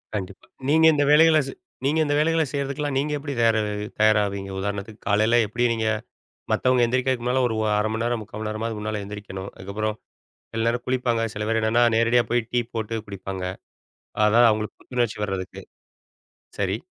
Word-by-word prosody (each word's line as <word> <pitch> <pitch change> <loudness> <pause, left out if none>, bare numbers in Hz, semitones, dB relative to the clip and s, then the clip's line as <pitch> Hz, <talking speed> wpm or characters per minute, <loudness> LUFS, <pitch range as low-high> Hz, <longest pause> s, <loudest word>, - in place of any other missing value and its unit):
கண்டிப்பா. 95 -1 -6 0.2
நீங்க 160 +1 +5
இந்த 145 -1 +2
வேலைகள 160 +1 +6
ச - - -5 0.3
நீங்க 155 +3 +2
இந்த 145 0 +1
வேலைகள 165 +2 +3
செய்றதுக்குலாம் 140 0 -2
நீங்க 150 +2 0
எப்படி 145 0 -5
தயார், 115 -1 +4 0.4
தயாராவிங்க? 100 -2 +2
உதாரணத்துக்கு 100 +2 -4
காலையில 110 +4 +3
எப்படி 120 +4 -2
நீங்க 110 -1 -1 0.6
மத்தவங்க 125 -1 +3
எந்திரிக்கறக்கு 130 0 0
முன்னால 125 +2 +1
ஒரு 110 - -2 0.2
1/2 105 +1 +1
மணி 115 +1 -2
நேரம், 120 -2 -1
3/4 105 - -11
மணி 110 0 -3
நேரமாவது 110 +1 -3
முன்னால 105 0 -3
எந்திரிக்கணும். 100 -1 -7
அதுக்கப்புறம் 105 +3 -3 0.6
சில 115 0 -1
நேரம் 120 +1 -1
குளிப்பாங்க, 125 -3 +1
சில 105 - -4
பேர் 115 0 +2
என்னன்னா 115 +2 +3
நேரடியா 115 +1 +4
போய் 120 -2 +1
டீ 120 -1 +2
போட்டு 115 0 -2
குடிப்பாங்க. 95 -1 -6 0.8
அதாது 115 +2 +6
அவங்களுக்கு 110 0 -3
புத்துணர்ச்சி 120 -3 -1
வரதுக்கு. 95 -2 -5 1.0
சரி. 95 0 0
115 Hz, 165 wpm, -24 LUFS, 105-125 Hz, 1.0 s, வேலைகள